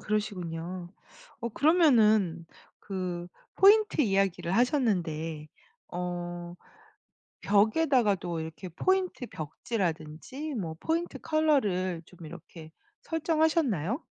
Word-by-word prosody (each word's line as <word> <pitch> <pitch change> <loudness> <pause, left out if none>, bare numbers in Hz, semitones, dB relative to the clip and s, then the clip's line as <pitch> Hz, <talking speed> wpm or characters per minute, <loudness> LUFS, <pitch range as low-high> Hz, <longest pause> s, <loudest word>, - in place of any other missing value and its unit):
그러시군요. 180 -4 -3 0.5
어 235 - -2
그러면은 220 - +4 0.3
그 180 -3 -4 0.3
포인트 415 -2 +5
이야기를 195 - +1
하셨는데 170 - 0 0.4
어 175 -1 -5 0.9
벽에다가도 205 - +2
이렇게 160 +3 -7
포인트 370 - 0
벽지라든지 170 - -4
뭐 170 -9 -4
포인트 335 +2 -2
컬러를 205 - +1
좀 175 0 -14
이렇게 160 0 -11 0.3
설정하셨나요? 315 - +1
195 Hz, 235 characters per minute, -29 LUFS, 170-280 Hz, 0.9 s, 포인트